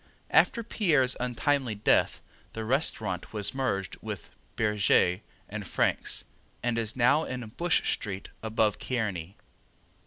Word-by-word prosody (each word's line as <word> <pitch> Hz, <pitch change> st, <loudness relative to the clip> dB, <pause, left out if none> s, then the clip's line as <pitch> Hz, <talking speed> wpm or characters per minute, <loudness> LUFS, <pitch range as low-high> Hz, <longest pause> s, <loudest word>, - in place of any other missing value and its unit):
After 235 Hz, -, +4 dB
Pierre's 155 Hz, -, +2 dB
untimely 125 Hz, 0 st, 0 dB
death 105 Hz, -, +2 dB, 0.3 s
the 110 Hz, 0 st, -4 dB
restaurant 110 Hz, -, -1 dB
was 105 Hz, +1 st, +1 dB
merged 115 Hz, -8 st, -2 dB
with -, -, -7 dB, 0.2 s
Bergez 105 Hz, -4 st, +3 dB, 0.3 s
and 105 Hz, -2 st, -6 dB
Frank's, -, -, 0 dB, 0.4 s
and 120 Hz, -1 st, +1 dB
is 110 Hz, -1 st, -2 dB
now 130 Hz, +5 st, +4 dB
in 125 Hz, -4 st, -5 dB
Bush 175 Hz, 0 st, +1 dB
street 100 Hz, -2 st, -5 dB
above 110 Hz, -1 st, +1 dB
Kearny. 100 Hz, -7 st, -3 dB
115 Hz, 120 wpm, -28 LUFS, 105-130 Hz, 0.4 s, After